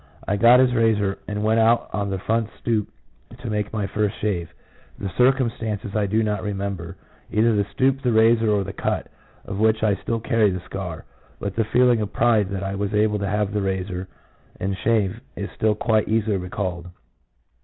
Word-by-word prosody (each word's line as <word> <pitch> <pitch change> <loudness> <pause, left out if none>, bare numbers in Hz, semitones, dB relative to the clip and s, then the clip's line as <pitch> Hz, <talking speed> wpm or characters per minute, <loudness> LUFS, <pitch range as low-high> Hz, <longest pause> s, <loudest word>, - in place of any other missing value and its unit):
I 100 - +1
got 120 +5 +7
his 130 -1 +4
razor 110 -4 +1
and 105 0 -3
went 110 +1 +3
out 115 +1 +3
on 100 -1 -1
the 95 - -2
front 110 +3 -1
stoop 110 -3 0 0.5
to 125 - -6
take 105 -1 -2
my 105 -2 -2
first 105 +1 -1
shave. 90 -6 -2 0.5
The 100 -2 -4
circumstances 115 -5 +1
I 105 -2 +1
do 110 +3 +1
not 105 -2 -1
remember 100 -3 -4 0.2
— - - -28
either 110 +1 +3
the 100 -1 +1
stoop, 135 +1 +1
the 125 - +1
razor, 115 0 +4
or 105 -2 +2
the 100 0 -7
cut, - - -2 0.4
of 100 0 -5
which 110 0 +2
I 105 -2 +4
still 115 - -2
carry 110 -1 +2
the 90 -1 -3
scar; 90 -3 -6 0.3
but 100 -1 -4
the 115 - +1
feeling 120 0 +3
of 105 -1 -3
pride 110 -5 +2
that 100 -1 -3
1 95 0 -3
was 105 +1 -1
able 105 0 +2
to 100 - -2
have 105 0 0
the 105 - 0
razor 95 -1 -3 0.5
and 95 +1 -1
shave 110 0 0
is 100 - -5
still 110 -1 +1
quite 110 -1 +1
easily 110 -2 +1
recalled. 90 -1 -4
105 Hz, 195 wpm, -23 LUFS, 100-115 Hz, 0.5 s, got